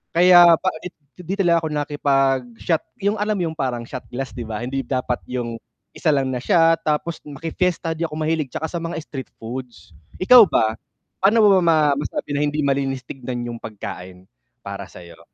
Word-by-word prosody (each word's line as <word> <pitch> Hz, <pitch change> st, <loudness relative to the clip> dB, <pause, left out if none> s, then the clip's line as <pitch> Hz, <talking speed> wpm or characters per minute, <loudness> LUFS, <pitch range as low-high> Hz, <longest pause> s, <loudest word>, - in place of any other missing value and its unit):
kaya 175 Hz, -1 st, +8 dB
pa -, -, -8 dB
pangit, 170 Hz, +3 st, -9 dB, 0.3 s
hindi 180 Hz, +1 st, -4 dB
talaga 175 Hz, -4 st, +3 dB
ako 160 Hz, -, -3 dB
nakipag-shot, 135 Hz, -1 st, 0 dB, 0.2 s
'yung 205 Hz, +1 st, +1 dB
alam 210 Hz, +1 st, 0 dB
mo 185 Hz, -, -1 dB
'yung 160 Hz, -, -12 dB
parang 125 Hz, -3 st, -2 dB
shot 125 Hz, +2 st, -8 dB
glass, 130 Hz, +2 st, -5 dB
'di 120 Hz, -3 st, -7 dB
ba, 110 Hz, +1 st, -4 dB
hindi 135 Hz, +2 st, -3 dB
dapat 130 Hz, -1 st, -2 dB
'yung 120 Hz, -2 st, -4 dB, 0.3 s
isa 155 Hz, -, 0 dB
lang 135 Hz, -2 st, +1 dB
na 125 Hz, -, -2 dB
shot. 165 Hz, +5 st, +3 dB
Tapos 155 Hz, +2 st, -1 dB
maki-fiesta, 165 Hz, +3 st, -2 dB
di 165 Hz, +1 st, -2 dB
ako 150 Hz, -, -9 dB
mahilig, 155 Hz, -1 st, -1 dB
'tsaka 160 Hz, +5 st, -4 dB
sa 170 Hz, -, -3 dB
mga 165 Hz, 0 st, -5 dB
street 135 Hz, -5 st, -7 dB
foods. 120 Hz, -3 st, -8 dB, 0.3 s
Ikaw 235 Hz, +1 st, +8 dB
ba, 110 Hz, -7 st, +1 dB, 0.4 s
paano 200 Hz, +4 st, +4 dB
mo 200 Hz, -2 st, +6 dB
ma 160 Hz, -4 st, +3 dB
masabi 145 Hz, 0 st, -4 dB
na 140 Hz, -, 0 dB
hindi 150 Hz, +1 st, -1 dB
malinis 135 Hz, -2 st, -1 dB
tignan 125 Hz, -1 st, -6 dB
'yung 120 Hz, -1 st, -6 dB
pagkain, 95 Hz, -4 st, -8 dB, 0.4 s
para -, -, -7 dB
sa 90 Hz, -, -13 dB
'yo? 85 Hz, -1 st, -14 dB
145 Hz, 190 wpm, -21 LUFS, 125-165 Hz, 0.4 s, kaya